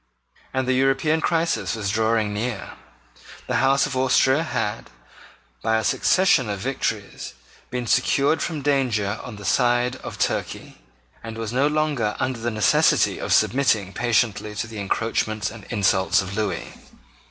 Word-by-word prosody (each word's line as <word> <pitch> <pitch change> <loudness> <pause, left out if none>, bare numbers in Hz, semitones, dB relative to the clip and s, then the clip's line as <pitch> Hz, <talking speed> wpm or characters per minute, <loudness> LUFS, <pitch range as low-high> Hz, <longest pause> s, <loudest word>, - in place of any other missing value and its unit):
And 130 -1 -1
the 130 - +2
European 135 +5 +2
crisis 165 -6 0
was 100 -3 -2
drawing 110 -1 +1
near. 110 -1 -4 0.7
The - - -1
House 135 +1 +3
of - - -4
Austria 130 +2 +3
had, 115 -9 -3 0.7
by 110 - +1
a 110 - -1
succession 160 - +3
of 100 - -2
victories, 110 -3 -4 0.3
been 125 -1 -3
secured 140 +6 +2
from 155 -4 -3
danger 115 -8 0
on 125 - -8
the 105 0 -10
side 120 +3 +2
of - - -8
Turkey, - - -3 0.4
and 115 0 -7
was 115 0 -4
no 135 +3 +3
longer 150 -8 0
under 130 -2 -2
the 120 +1 -2
necessity 110 -3 +2
of - - -4
submitting 110 -8 +2
patiently 110 -2 0
to 105 - -2
the 110 -2 -8
encroachments 110 +1 -1
and 110 -3 -11
insults 100 -3 +2
of 95 0 -4
Lewis. 100 -5 -2
115 Hz, 150 wpm, -23 LUFS, 105-135 Hz, 0.7 s, House